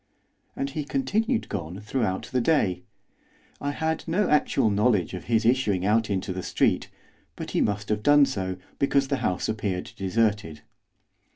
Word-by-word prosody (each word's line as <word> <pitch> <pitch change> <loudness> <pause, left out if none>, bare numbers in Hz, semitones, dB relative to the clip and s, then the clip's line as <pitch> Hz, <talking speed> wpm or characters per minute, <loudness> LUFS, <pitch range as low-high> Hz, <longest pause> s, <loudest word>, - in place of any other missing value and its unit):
And 140 0 -3
he 150 +1 -3
continued 225 - 0
gone 90 -1 -5
throughout 105 0 -2
the 130 -1 +1
day. 105 - +2 0.8
I 145 - -1
had 160 +2 -2
no 185 +5 +1
actual 135 -6 +3
knowledge 100 -4 +2
of 90 - -6
his 110 -1 +1
issuing 110 -7 +2
out 110 +1 +2
into 95 -1 -1
the 95 - -4
street, - - +1 0.5
but - - -6
he - - +1
must 105 0 -1
have 105 -1 0
done 145 +3 +6
so, 95 -6 -3 0.2
because 140 0 +2
the 140 - +1
house 95 -8 -1
appeared 105 -4 -3
deserted. 100 -6 0
110 Hz, 160 wpm, -26 LUFS, 95-140 Hz, 0.8 s, done